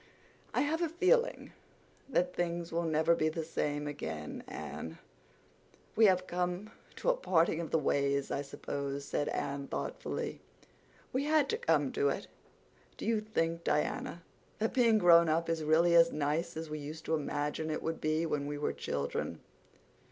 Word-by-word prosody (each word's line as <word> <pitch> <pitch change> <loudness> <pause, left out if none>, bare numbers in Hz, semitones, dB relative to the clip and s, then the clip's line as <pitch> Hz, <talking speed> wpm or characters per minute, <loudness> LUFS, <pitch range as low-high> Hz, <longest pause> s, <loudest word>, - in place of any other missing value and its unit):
"I - - +1
have 315 +3 0
a 340 - +1
feeling 375 +9 +2 0.6
that 180 -8 +1
things 170 -1 -2
will 170 +1 0
never 160 +1 +3
be 155 -2 +2
the 160 +1 -3
same 150 -2 -2
again, 80 - -5
Anne." 80 0 -6 1.0
"We 225 - +6
have 185 -1 +3
come 180 +3 -2 0.2
to - - 0
a - - 0
parting 170 - +2
of 165 - -5
the - - +2
ways, 140 -2 +1
I 140 - 0
suppose," 140 0 -4
said 145 - -1
Anne 140 0 -3
thoughtfully. - - -4 0.7
"We 265 +3 0
had 305 -2 +3
to 450 - 0
come 480 - +2
to 430 0 +2
it. - - -2 0.7
Do - - -6
you 225 -2 +2
think, 170 -6 -1
Diana, 165 +2 -1 0.3
that 220 +1 -1
being 235 -4 +5
grown 170 -4 +7
up 165 +2 +1
is 165 -1 0
really 165 +3 +4
as 170 0 +7
nice 155 +3 -1
as 160 0 -4
we 155 0 -5
used 155 +2 -7
to 160 - -1
imagine 150 +1 -1
it 155 - -2
would 165 0 -3
be 155 +2 +1
when 145 -3 -1
we 145 0 -3
were 145 - -1
children?" 70 0 -3
165 Hz, 170 wpm, -32 LUFS, 150-185 Hz, 1.0 s, grown